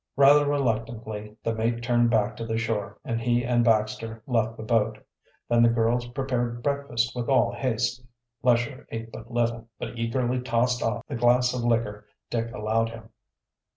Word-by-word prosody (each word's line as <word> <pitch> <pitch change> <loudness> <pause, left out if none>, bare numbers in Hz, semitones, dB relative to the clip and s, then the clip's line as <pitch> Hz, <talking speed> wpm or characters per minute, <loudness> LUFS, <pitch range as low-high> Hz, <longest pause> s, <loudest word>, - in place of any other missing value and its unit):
Rather 145 +2 +6
reluctantly 110 -5 -2
the 115 - 0
mate 115 +1 -1
turned 120 -1 +3
back 110 -1 +1
to 115 - -6
the 115 0 -2
shore 110 -3 -2
and 115 -2 -2
he 120 0 +1
and 120 -1 +2
Baxter 110 0 0
left 115 -3 0
the - - -6
boat. 110 -1 +1 0.5
Then 120 0 +3
the 115 - +6
girls 115 +1 +1
prepared 120 -2 -2
breakfast 140 -5 -1
with 120 0 -3
all 135 -2 +3
haste. 125 -1 -1 0.4
Lesher 125 +2 +1
ate 115 0 -6
but 115 +1 -10
little, 115 -1 -1
but 115 - -6
eagerly 120 +2 0
tossed 125 0 +1
off 115 - -1
the - - -5
glass 125 +1 +3
of 125 -1 -2
liquor 115 -3 0 0.2
Dick 115 0 -1
allowed 115 0 0
him. 115 -1 -11
115 Hz, 170 wpm, -26 LUFS, 115-120 Hz, 0.5 s, Rather